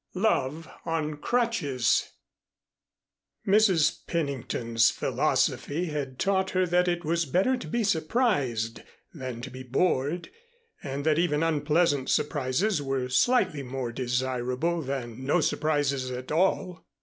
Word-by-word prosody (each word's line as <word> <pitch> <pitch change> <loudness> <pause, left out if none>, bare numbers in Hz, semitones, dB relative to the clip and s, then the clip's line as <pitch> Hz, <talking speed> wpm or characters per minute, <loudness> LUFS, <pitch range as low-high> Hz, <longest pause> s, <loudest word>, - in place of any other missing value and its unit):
XIX 185 - -3
LOVE 160 -6 +1 0.2
ON 155 -2 -2
CRUTCHES 170 - +1 1.4
Mrs. 195 -6 +4
Pennington's 120 -7 +1
philosophy 160 +5 0
had 140 -4 -4
taught 190 +2 +1
her 185 0 +1
that 180 +1 +2
it 175 -1 -1
was 165 0 0
better 190 - +2
to 250 - -7
be 235 0 0
surprised 155 - 0 0.3
than 130 -6 -6
to 130 +1 -7
be 130 +1 -8
bored, 140 +4 0 0.5
and 140 +1 -4
that 155 0 +3
even 165 -3 +1
unpleasant 150 -2 +1
surprises 150 +6 +1
were 135 -2 -2
slightly 185 - +2
more 130 -2 -4
desirable 125 +6 -1
than 130 -3 -5
no 145 +6 +2
surprises 145 -5 0
at 125 +1 -6
all. 180 +1 0
150 Hz, 125 wpm, -27 LUFS, 130-175 Hz, 1.4 s, Mrs